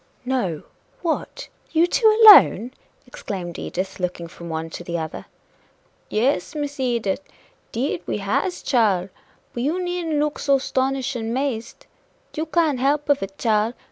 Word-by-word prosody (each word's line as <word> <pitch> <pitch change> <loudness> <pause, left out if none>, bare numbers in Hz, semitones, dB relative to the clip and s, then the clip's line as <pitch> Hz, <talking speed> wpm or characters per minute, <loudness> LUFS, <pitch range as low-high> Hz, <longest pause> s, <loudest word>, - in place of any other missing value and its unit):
"No! 220 - -1 0.4
what? 350 +8 -3 0.2
you 330 +1 +4
two 440 +6 +2 0.2
alone!" 255 - +8 0.3
exclaimed 185 -8 -6
Edith, 190 +2 -4
looking 175 -2 -3
from 170 0 -10
one 160 0 -4
to 175 - -7
the 170 0 -3
other. 160 -1 -6 0.8
"Yes, 220 - 0
Miss 290 -1 -4
Edith, 240 -3 -1 0.5
'deed 275 +8 -2
we - - -1
has, 210 - -2
chile 205 -8 +2 0.4
but 240 - -4
you 305 +8 0
needn't 355 -4 -2
look 300 0 -1
so 280 -1 +3
'stonish 265 0 -1
and 225 -1 -3
'mazed. 260 -4 -3 0.5
You 315 +1 -2
can't 315 -5 +1
help 290 +3 +1
of 285 -1 +3
it, 195 0 -6
chile. 220 +1 +1
250 Hz, 145 wpm, -22 LUFS, 195-295 Hz, 0.8 s, alone